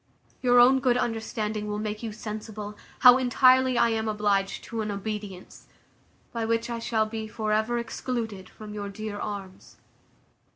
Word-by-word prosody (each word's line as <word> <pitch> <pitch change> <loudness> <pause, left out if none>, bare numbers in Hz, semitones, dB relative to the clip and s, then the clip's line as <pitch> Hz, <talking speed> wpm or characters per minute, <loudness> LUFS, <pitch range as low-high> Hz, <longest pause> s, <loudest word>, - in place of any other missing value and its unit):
Your 245 -1 +5
own 260 +2 +7
good 250 -2 +2
understanding 220 -2 -2
will 210 0 -2
make 210 0 -4
you 225 -2 -4
sensible, 215 -1 -7 0.3
how 250 0 +9
entirely 255 0 +4
I 235 - +4
am 225 -1 -1
obliged 205 -2 0
to 230 -1 -4
an 215 - -3
obedience, 200 -2 -6 0.7
by 230 -1 -2
which 230 +1 0
I 235 - -3
shall 225 -1 +1
be 220 0 -5
for 215 0 -3
ever 220 +3 +1
excluded 225 -4 -4
from 210 -1 -10
your 205 -1 -5
dear 210 0 -6
arms. 195 -3 -7
220 Hz, 160 wpm, -27 LUFS, 210-235 Hz, 0.7 s, how